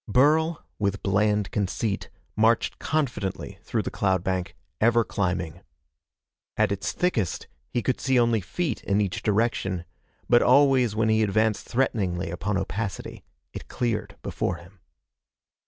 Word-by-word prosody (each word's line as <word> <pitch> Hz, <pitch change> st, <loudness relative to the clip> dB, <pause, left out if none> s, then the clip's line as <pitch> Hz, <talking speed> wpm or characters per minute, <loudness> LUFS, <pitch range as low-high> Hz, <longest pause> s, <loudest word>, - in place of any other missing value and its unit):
Burl, 155 Hz, +8 st, +3 dB
with 100 Hz, -1 st, -1 dB
bland 105 Hz, +1 st, +1 dB
conceit, 100 Hz, +1 st, -2 dB, 0.3 s
marched 110 Hz, +1 st, +2 dB
confidently 120 Hz, -11 st, -2 dB
through -, -, -2 dB
the -, -, -4 dB
cloud 95 Hz, -3 st, +1 dB
bank, 95 Hz, 0 st, -2 dB, 0.2 s
ever 115 Hz, +1 st, +4 dB
climbing. 90 Hz, -6 st, -2 dB, 1.0 s
At -, -, +3 dB
its 100 Hz, -, -2 dB
thickest, 120 Hz, -, -1 dB, 0.2 s
he 120 Hz, -, -1 dB
could 130 Hz, -, -1 dB
see 130 Hz, -2 st, +3 dB
only 115 Hz, -2 st, +3 dB
feet 160 Hz, -, -3 dB
in 100 Hz, 0 st, +1 dB
each 100 Hz, -3 st, -1 dB
direction, 100 Hz, -5 st, 0 dB, 0.4 s
but 120 Hz, 0 st, +5 dB
always 130 Hz, -4 st, +4 dB
when 110 Hz, 0 st, +2 dB
he 110 Hz, 0 st, +3 dB
advanced 110 Hz, +1 st, +1 dB
threateningly 95 Hz, -9 st, 0 dB
upon 95 Hz, +3 st, -2 dB
opacity, 95 Hz, +1 st, -4 dB, 0.3 s
it -, -, -8 dB
cleared 120 Hz, -3 st, -2 dB
before -, -, -2 dB
him. 90 Hz, +3 st, -15 dB
105 Hz, 135 wpm, -26 LUFS, 95-120 Hz, 1.0 s, but